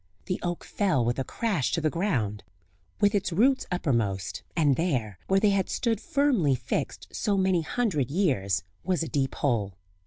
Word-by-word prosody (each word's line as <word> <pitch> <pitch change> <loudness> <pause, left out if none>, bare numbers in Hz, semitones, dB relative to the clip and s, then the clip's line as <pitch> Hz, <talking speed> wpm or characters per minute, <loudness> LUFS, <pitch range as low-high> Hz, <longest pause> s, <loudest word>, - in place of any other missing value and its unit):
The 185 - -2
oak 175 -1 -3
fell 165 - +1
with 120 +2 0
a - - +1
crash 190 - -1
to - - +2
the 155 -1 +1
ground, 120 - -1 0.6
with 205 +1 +4
its 200 -2 0
roots 255 +10 +3
uppermost, 115 - -1
and 145 -5 +3
there, 125 - -1
where 195 0 +4
they 205 0 +4
had 195 -1 +1
stood 230 -3 0
firmly 275 - +2
fixed - - -3
so 205 -2 0
many 190 -2 +2
hundred 160 - 0
years, 130 - +1 0.2
was 180 -3 0
a - - -4
deep 135 -3 -1
hole. 105 -8 0
165 Hz, 175 wpm, -27 LUFS, 125-200 Hz, 0.6 s, with